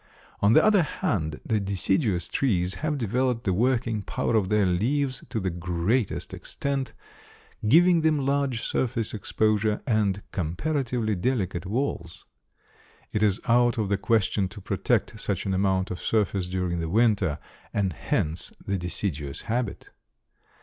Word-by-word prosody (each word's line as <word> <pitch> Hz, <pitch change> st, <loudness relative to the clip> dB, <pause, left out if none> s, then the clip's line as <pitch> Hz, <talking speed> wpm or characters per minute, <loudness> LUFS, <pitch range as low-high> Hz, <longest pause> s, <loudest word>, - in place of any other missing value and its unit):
On 100 Hz, +2 st, +5 dB
the -, -, +6 dB
other 215 Hz, -3 st, +5 dB
hand, 80 Hz, -, -2 dB
the 110 Hz, -2 st, +1 dB
deciduous 95 Hz, -1 st, 0 dB
trees 95 Hz, -9 st, 0 dB
have 155 Hz, -1 st, 0 dB
developed 125 Hz, 0 st, 0 dB
the 95 Hz, -, +1 dB
working 115 Hz, 0 st, +1 dB
power 115 Hz, -, -1 dB
of 100 Hz, -4 st, +2 dB
their 105 Hz, -1 st, +3 dB
leaves 130 Hz, +9 st, 0 dB
to 110 Hz, -, -2 dB
the 95 Hz, -2 st, -1 dB
greatest 90 Hz, +7 st, -1 dB
extent, 140 Hz, -1 st, -3 dB, 0.7 s
giving 170 Hz, +6 st, +6 dB
them 155 Hz, -3 st, +2 dB
large 140 Hz, -4 st, 0 dB
surface 115 Hz, -3 st, -1 dB
exposure 110 Hz, 0 st, +1 dB
and 105 Hz, -4 st, +1 dB
comparatively 120 Hz, -, -1 dB
delicate 95 Hz, -4 st, -1 dB
walls. 105 Hz, -7 st, -3 dB, 0.9 s
It 105 Hz, -, -1 dB
is 105 Hz, -1 st, +3 dB
out 120 Hz, 0 st, +4 dB
of 105 Hz, -3 st, 0 dB
the 100 Hz, -, +2 dB
question 105 Hz, -3 st, +1 dB
to 105 Hz, +3 st, -10 dB
protect 105 Hz, +2 st, -1 dB
such 100 Hz, -4 st, -2 dB
an 95 Hz, -, 0 dB
amount 95 Hz, 0 st, +1 dB
of 90 Hz, -, -4 dB
surface 100 Hz, -4 st, 0 dB
during 90 Hz, -2 st, -1 dB
the 80 Hz, -1 st, -2 dB
winter, 100 Hz, -6 st, +2 dB, 0.3 s
and 95 Hz, -3 st, 0 dB
hence 80 Hz, +2 st, -1 dB
the 100 Hz, -1 st, -1 dB
deciduous 80 Hz, -5 st, -3 dB
habit. 120 Hz, -1 st, -3 dB
105 Hz, 145 wpm, -26 LUFS, 95-125 Hz, 0.9 s, the